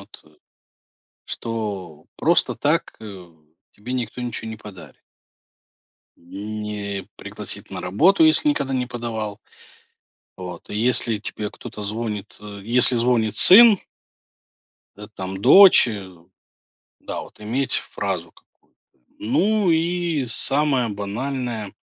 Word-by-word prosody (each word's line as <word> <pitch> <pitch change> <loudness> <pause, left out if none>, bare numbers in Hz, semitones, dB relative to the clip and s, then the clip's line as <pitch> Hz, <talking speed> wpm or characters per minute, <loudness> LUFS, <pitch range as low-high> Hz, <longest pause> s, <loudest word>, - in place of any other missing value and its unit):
вот, - - -14
э, 75 - -22 1.0
что 100 -9 -5
просто - - +2
так, - - 0
э, 95 -5 -10 0.4
тебе 120 +5 -8
никто 125 0 -4
ничего 115 -2 -5
не 110 - -7
подарит. 105 -4 -13 1.2
Не 100 +2 -6
пригласит - - -7
на - - -6
работу, 155 - +3
если 315 -1 +4
никогда 135 - -1
не 125 -1 0
подавал 115 -4 -5 1.0
вот, 90 -2 -9
и - - -5
если 120 -1 +1
тебе 105 0 -5
кто-то 105 - -10
звонит, 105 -1 -5
э, 100 -1 -10
если 120 +3 +4
звонит 115 -2 +1
сын 215 +2 +8 1.2
да, 105 0 -10
там 95 -2 -6
дочь, 195 - +8
э, 100 -4 -6 0.9
да - - -6
вот, - - -14
иметь 120 +6 -2
фразу - - -3
какую-то. - - -29 0.4
Ну, 200 - +1
и 170 -3 0
самое 135 +1 +1
банальное 110 +1 -4
110 Hz, 115 wpm, -22 LUFS, 105-130 Hz, 1.2 s, сын